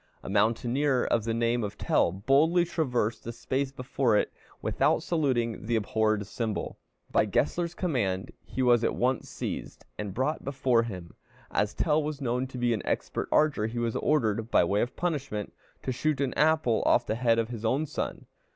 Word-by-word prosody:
A - - -6
mountaineer 120 +6 +2
of 115 -2 +1
the 115 - 0
name 115 0 +1
of 100 - -5
Tell - - +2
boldly 140 - +3
traversed 125 -9 -1
the 115 - -5
space 130 +3 -2
before 125 -3 +1
it - - 0 0.3
without - - +1
saluting 120 - 0
the 120 - +1
abhorred 110 -1 +1
symbol. 110 +1 -4 0.3
By - - +3
Gessler's 170 -1 0
command 105 - -1
he 130 - -3
was 120 -2 +4
at - - +1
once 125 0 0
seized - - -6
and 105 -2 -3
brought 135 +5 -1
before 130 -3 +2
him. 95 -7 -7 0.4
As 105 - 0
Tell 155 -1 +2
was 150 -1 -4
known 125 -1 -1
to 130 - -9
be 120 -1 +2
an 110 - -2
expert - - -2
archer, 150 -8 +3
he 115 +2 -6
was 115 -1 -1
ordered, 115 -7 +1
by - - +4
way 100 +4 +1
of 120 - -2
punishment, 140 - -3 0.3
to 130 - -1
shoot 150 +2 0
an 140 -2 0
apple 155 -7 +3
off 120 - +4
the - - -1
head 115 0 +2
of 115 0 0
his 115 -3 -6
own 130 +7 +1
son. 150 - -4
120 Hz, 185 wpm, -28 LUFS, 110-140 Hz, 0.4 s, was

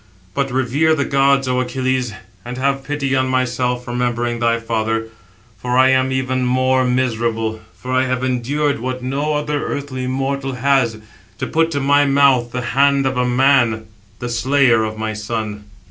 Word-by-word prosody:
But 140 +4 -1
revere 135 +5 +1
the 140 - -1
gods, 135 0 +2
O 125 0 +1
Achilles, 130 -1 -1 0.3
and 125 +3 -7
have 135 +1 0
pity 140 -1 -1
on 130 0 +1
myself, 125 -1 -1
remembering 120 -1 -1
thy 115 0 +1
father; 110 -1 -2 0.5
for 125 0 -1
I 130 0 +6
am 130 0 +2
even 130 -1 -1
more 130 +1 +2
miserable, 115 -3 -1 0.2
for 130 - -7
I 130 0 +2
have 130 0 -2
endured 140 +3 0
what 130 +1 -4
no 145 +4 -1
other 150 0 -2
earthly 130 -3 -4
mortal 135 +1 -2
[has], 125 -3 +1 0.4
to - - -3
put 165 +1 +1
to 145 -3 -2
my 145 +1 +3
mouth 135 -4 +3
the 125 - -3
hand 140 0 +3
of 130 0 0
a 125 0 +1
man, 125 -3 +3 0.3
the 120 - -5
slayer 120 0 +3
of 110 0 -4
my 110 0 -3
son." 105 -1 -4
130 Hz, 170 wpm, -19 LUFS, 120-135 Hz, 0.5 s, I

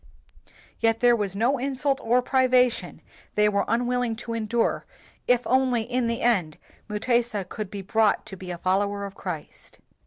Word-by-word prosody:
Yet 225 0 +2
there 240 -1 +5
was 200 -4 -2
no 240 +6 +1
insult 275 +1 0
or 245 +2 +2
privation 255 -2 +2 0.3
they 210 0 +4
were 200 -1 +1
unwilling 245 0 0
to 230 0 -6
endure 230 +1 -1 0.4
if 245 0 +3
only 255 -3 +2
in 245 +1 -1
the 230 0 -2
end 185 -10 +1 0.3
Mutesa 215 -2 0
could 210 0 -6
be 200 0 -6
brought 220 +2 +2
to 195 - -9
be 185 -1 -9
a 175 - -4
follower 200 +3 0
of 200 - -8
Christ. 180 -6 -8
230 Hz, 160 wpm, -25 LUFS, 200-245 Hz, 0.4 s, there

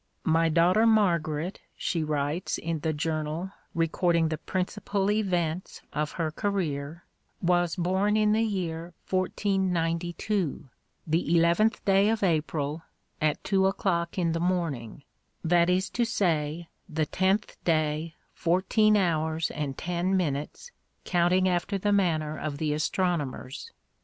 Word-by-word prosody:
"My 165 +1 +3
daughter 175 +7 +4
Margaret," 170 -6 +1 0.2
she 165 -3 -1
writes 150 +3 -1
in 165 -1 -3
the 160 +2 -1
journal 155 +3 -2 0.2
recording 165 0 +2
the 155 -1 -3
principal 195 +1 -1
events 180 -5 -1
of 150 0 -2
her 160 -3 -2
career, 160 -4 -2 0.3
"was 175 -1 +2
born 190 +4 +1
in 215 -1 +3
the 220 +1 +3
year 175 -6 -3 0.2
1492, 185 -2 -1 0.4
the 165 +1 +2
eleventh 170 +7 +3
day 195 +1 +4
of 225 -2 0
April, 155 -3 0 0.4
at 155 -1 +1
two 190 -1 +3
o'clock 175 -3 -1
in 170 -2 +1
the 165 - -1
morning; 160 -9 -2 0.4
that 170 +1 +3
is 185 +1 +2
to 240 - +1
say, 170 -7 0 0.2
the 155 -1 0
tenth 190 +6 0
day, 155 0 0 0.2
fourteen 195 +5 +3
hours 160 -3 0
and 140 -3 -4
ten 180 +2 0
minutes, 150 - -3 0.3
counting 180 +1 +3
after 185 +3 0
the 205 +2 +1
manner 155 -6 +1
of 150 -2 -4
the 150 0 0
astronomers." 155 - -2
170 Hz, 125 wpm, -27 LUFS, 155-190 Hz, 0.4 s, daughter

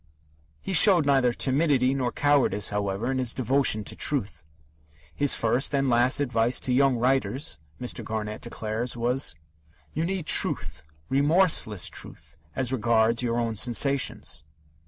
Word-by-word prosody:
'" 75 0 -37
He 195 - -2
showed 180 -2 +6
neither 135 -3 +2
timidity 135 0 +1
nor 130 -3 -2
cowardice, 130 -10 +1
however, 105 +4 -2
in 130 - -2
his 125 -2 -2
devotion 130 -3 +2
to - - -6
truth. 130 - -1 0.7
His 145 -1 +2
first 125 +5 0
and 135 0 0
last 125 +2 +2
advice 120 -3 +1
to 125 - -1
young 135 0 +3
writers, 130 - -1 0.2
Mr. 125 - -4
Garnett 110 -1 -5
declares, 115 +1 -5
was: 125 - 0 0.6
"You 155 - -2
need 180 -1 -3
truth, - - +1 0.3
remorseless 145 - +2
truth, - - -10 0.2
as 130 -1 -1
regards 115 -1 +1
your 120 -1 -2
own 115 -1 -1
sensations." 125 - 0
125 Hz, 140 wpm, -25 LUFS, 115-140 Hz, 0.7 s, showed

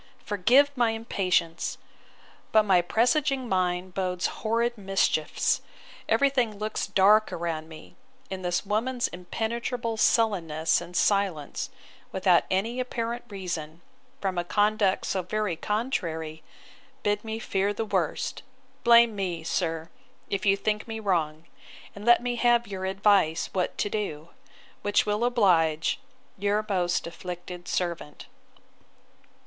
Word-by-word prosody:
'Forgive 245 +9 +4
my 240 -3 +3
impatience: 185 -7 -1 0.7
But 215 0 +5
my 190 -4 +4
presaging 255 - +1
mind 185 -2 0
bodes 180 -1 -1 0.2
horrid 230 +2 +1
mischiefs! 195 -6 +1 0.5
Every 280 -1 +4
thing 240 -6 0
looks 215 +1 -2
dark 210 +3 +4
around 165 -2 -3
me; 160 -1 -12 0.4
and 190 -1 -5
this 175 +2 -1
woman's 240 +5 0
impenetrable 230 +5 -3
sullenness 170 -10 +2
and 175 +1 -6
silence, 195 -8 0 0.4
without 185 -2 +3
any 225 +7 0
apparent 240 -1 -3
reason, 175 -5 -5 0.4
from 190 -3 -1
a - - 0
conduct 205 +1 +2
so 190 - -1
very 205 0 -2
contrary, 165 - -2 0.6
bid 205 0 0
me 220 0 -4
fear 200 -3 0
the 220 +2 -3
worst.—blame 235 - +1
me, 180 -5 -3
sir, 165 -1 -2 0.4
if 200 0 -1
you 195 0 +5
think 210 +2 -1
me 225 -1 -5
wrong; 165 -6 -1 0.5
and 200 +1 -9
let 240 0 +6
me 245 -1 -1
have 240 0 +3
your 190 -2 -5
advice 190 -4 +2
what 185 -2 -1
to - - 0
do; 170 -7 -4 0.5
which 205 0 +2
will 210 +2 0
oblige 180 - +2 0.4
'Your 205 +2 +1
most 180 -4 0
afflicted 175 +1 -7
servant. 170 -4 -3
200 Hz, 125 wpm, -27 LUFS, 175-225 Hz, 0.7 s, let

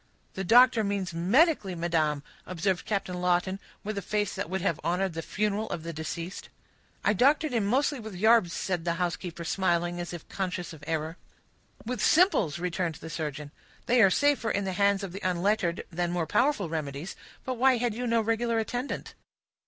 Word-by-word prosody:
"The 190 - -4
doctor 240 +3 +6
means 200 -3 -2
medically, 200 - +3
madam," 160 -4 0 0.2
observed 185 +1 -1
Captain 185 -4 -2
Lawton, 180 +2 +1 0.2
with 210 -1 -3
a - - -6
face 205 +1 -1
that - - -4
would 190 0 -2
have 170 -5 0
honored 180 +2 0
the 165 - -4
funeral 210 +4 -1
of 165 - -4
the 170 0 -5
deceased. 165 +3 -6 0.6
"I 205 - +4
doctored 290 - +3
him 220 -4 +1
mostly 275 +4 +1
with 220 -3 -8
yarbs," 220 -2 +4
said 180 -2 -2
the 170 0 0
housekeeper, 175 -1 -3
smiling, 175 0 0
as 175 - -4
if 175 -3 -8
conscious 180 -3 -4
of 155 -2 -13
error. 160 +1 -2 0.7
"With 245 -1 -3
simples," 335 - +4
returned 175 -1 -2
the 160 +1 -9
surgeon. 150 -2 -4 0.3
"They 245 0 +4
are 195 - +7
safer 285 +1 +2
in 200 - 0
the 190 -1 -2
hands 200 +1 +2
of 195 - -5
the 195 - -7
unlettered 185 0 0
than 175 +1 -1
more 175 -2 -1
powerful 240 - +1
remedies; 155 +1 -4 0.3
but 255 -2 -3
why 260 0 +5
had 240 -1 0
you 245 +3 -3
no 230 -1 +3
regular 230 +1 0
attendant?" 245 +4 -3
190 Hz, 185 wpm, -28 LUFS, 170-220 Hz, 0.7 s, are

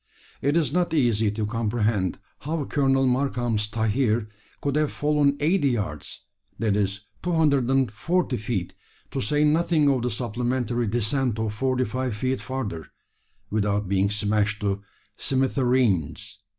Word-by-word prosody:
It 145 +4 +2
is 155 -4 +1
not 175 -2 +1
easy 115 -6 +3
to 105 +1 -2
comprehend 110 -3 0 0.2
how 155 0 -3
Colonel 135 -1 +2
Markham's 125 -4 0
tahir 110 0 0 0.3
could 140 -1 -1
have 150 -1 +1
fallen 145 -1 +2
eighty 155 -1 +2
yards 100 - -4 0.3
that 105 -1 +1
is, 100 -1 0 0.2
240 140 - +1
feet 105 -4 -3 0.4
to - - -2
say 145 +8 +1
nothing 155 0 +3
of 130 -3 +1
the 125 - 0
supplementary 120 +1 -1
descent 120 +2 0
of 110 -1 -1
forty 130 +2 0
five 125 +1 -2
feet 130 +4 -1
further 105 - -4 0.6
without 105 -1 0
being 95 +1 +2
smashed 105 +1 0
to 100 -1 -1 0.4
"smithereens." 120 - 0
120 Hz, 130 wpm, -25 LUFS, 105-135 Hz, 0.6 s, easy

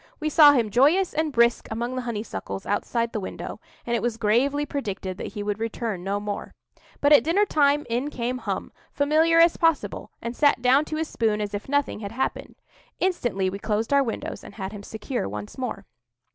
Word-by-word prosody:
We 310 -1 -1
saw 295 -1 +8
him 230 -6 +1
joyous 310 - +4
and 310 0 0
brisk 235 -2 +3
among 235 +3 -3
the 255 - -2
honeysuckles 225 -4 -5
outside 230 +3 -1
the 215 - -1
window, 190 - -6 0.3
and 235 - 0
it - - 0
was 240 -2 -1
gravely 255 +7 +2
predicted 200 -9 -4
that - - -6
he 205 -2 -4
would 205 0 -2
return 225 -4 -3
no 200 +2 -1
more. 205 0 -5 0.5
But 285 +1 +5
at 295 - +7
dinner 370 +7 +3
time 295 -4 +2
in 245 +5 -1
came 250 -2 -3
Hum, - - -4 0.2
familiar 310 +3 +3
as 335 0 +5
possible, 330 -3 0
and 235 +1 -5
sat 290 -2 +3
down 260 +4 +4
to 310 - -4
his 320 0 -2
spoon 220 -5 0
as 210 -1 -3
if 205 +5 -5
nothing 285 -5 0
had 200 0 -6
happened. 260 +3 -3 0.4
Instantly 240 - 0
we 195 +2 -3
closed 220 +5 -1
our 280 - +5
windows 235 -5 -4
and - - -12
had 190 -2 -5
him 205 -1 -8
secure 220 - -4
once 105 +1 -7
more. 225 -6 -4
240 Hz, 200 wpm, -25 LUFS, 210-290 Hz, 0.5 s, saw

